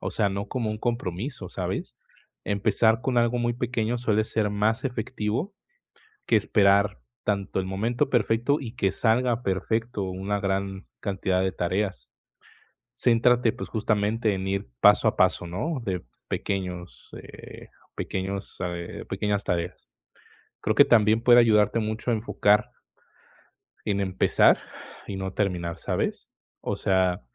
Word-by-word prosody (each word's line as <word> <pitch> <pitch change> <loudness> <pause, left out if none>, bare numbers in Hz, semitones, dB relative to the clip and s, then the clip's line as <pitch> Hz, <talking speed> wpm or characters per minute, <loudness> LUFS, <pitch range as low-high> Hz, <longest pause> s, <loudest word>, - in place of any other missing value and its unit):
o - - -3
sea, 105 -3 +1
no 100 +1 -3
como 115 -4 -2
un 110 - -4
compromiso, 115 - -3
¿sabes? - - -4 0.5
Empezar 110 +2 +2
con 125 -2 +1
algo 120 +1 +2
muy 120 0 +1
pequeño 120 -1 -1
suele 110 -3 +1
ser 110 -2 0
más 105 +4 0
efectivo, 125 - -2 0.7
que 115 - +3
esperar 100 - +3 0.2
tanto 100 -2 -1
el 95 - -2
momento 115 +7 -1
perfecto 120 +3 +2
y 120 -3 -7
que 95 -5 +1
salga 120 +3 +1
perfecto 105 +3 -1
una 95 +2 -2
gran 95 -1 -2
cantidad 95 -2 -1
de 95 - 0
tareas. 95 -5 -2 0.8
Céntrate, 120 0 +3
pues 125 - -7
justamente 105 0 0
en 95 0 -3
ir 95 -8 -2
paso - - +6
a - - +2
paso, - - +2
¿no?, 130 - -3
de 90 - -3 0.2
pequeños, 90 -3 -4
eh, - - -12 0.3
pequeños 95 +1 -4
eh, 85 -1 -6
pequeñas 105 -1 -1
tareas, 85 0 -3 0.7
creo - - 0
que - - +8
también 110 -1 +4
puede 120 0 +7
ayudarte 110 -1 +4
mucho 110 +2 -3
a - - +3
enfocar 105 -1 +2 1.1
en 100 -1 0
empezar 95 -1 +3 0.5
y 100 - -5
no 95 0 -4
terminar, 90 -5 -2
¿sabes? - - -3 0.3
O - - -3
sea, 95 -2 +1
105 Hz, 140 wpm, -26 LUFS, 95-115 Hz, 1.1 s, que